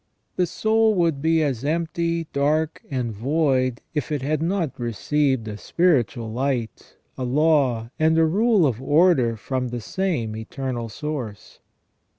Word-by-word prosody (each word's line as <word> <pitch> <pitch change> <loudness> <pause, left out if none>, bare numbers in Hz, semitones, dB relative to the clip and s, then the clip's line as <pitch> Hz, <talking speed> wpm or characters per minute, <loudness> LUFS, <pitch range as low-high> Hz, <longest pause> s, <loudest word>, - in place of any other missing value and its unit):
The 180 - +1
soul 220 +3 +2
would 165 -6 +1
be 160 +1 +3
as 135 -5 -2
empty, 165 +2 -1
dark, 150 +3 0
and 125 -5 -2
void 130 +1 0
if 150 -1 -3
it 145 -3 -2
had 150 +2 0
not 170 -5 -1
received 130 +1 0
a 105 -1 -5
spiritual 125 - +1
light, 125 -3 -3 0.2
a - - -2
law, 130 -4 +2
and 160 +1 +3
a 165 - +5
rule 205 +2 +3
of 125 -4 -1
order 145 -5 +3
from 130 +3 -3
the 120 0 -4
same 120 - -2
Eternal 120 +1 -4
Source. 125 -5 -6
145 Hz, 145 wpm, -23 LUFS, 120-165 Hz, 0.2 s, a